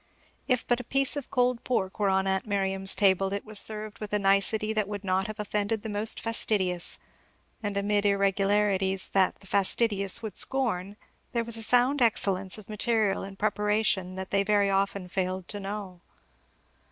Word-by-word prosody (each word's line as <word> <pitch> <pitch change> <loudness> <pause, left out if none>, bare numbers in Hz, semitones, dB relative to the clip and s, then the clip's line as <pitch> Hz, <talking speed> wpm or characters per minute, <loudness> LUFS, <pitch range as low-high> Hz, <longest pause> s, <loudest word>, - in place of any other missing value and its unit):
If 255 -3 +1
but 245 0 +1
a - - -6
piece 275 +3 +1
of 285 -3 -6
cold 250 -2 0
pork 195 -5 -2
were 205 -2 +2
on 190 0 +1
aunt 190 +2 -1
Miriam's 195 -1 +3
table, 195 -1 +2
it 200 - -4
was 215 -1 -2
served 215 0 0
with 210 -1 -7
a - - +3
nicety 200 +2 +1
that 215 -2 0
would 205 -1 -6
not 190 0 0
have 215 0 -8
offended 210 +1 -2
the 220 - -5
most 210 +1 +2
fastidious; 190 -6 -1 0.6
and 205 -2 -3
amid 205 0 +1
irregularities 195 -1 +1
that 190 -1 +1
the - - -15
fastidious 200 +1 +1
would 215 -4 -6
scorn, 210 -7 0 0.4
there 235 -1 0
was 230 0 -1
a 225 - -4
sound 250 +5 +2
excellence 195 -5 +2
of 215 - -12
material 215 -1 0
and 195 0 -9
preparation 210 -3 0
that 190 0 -7
they 200 - +2
very 200 0 +2
often 195 -1 -1
fail 185 0 -3
to 205 +3 -6
know. 195 -3 -7
205 Hz, 175 wpm, -27 LUFS, 195-215 Hz, 0.6 s, Miriam's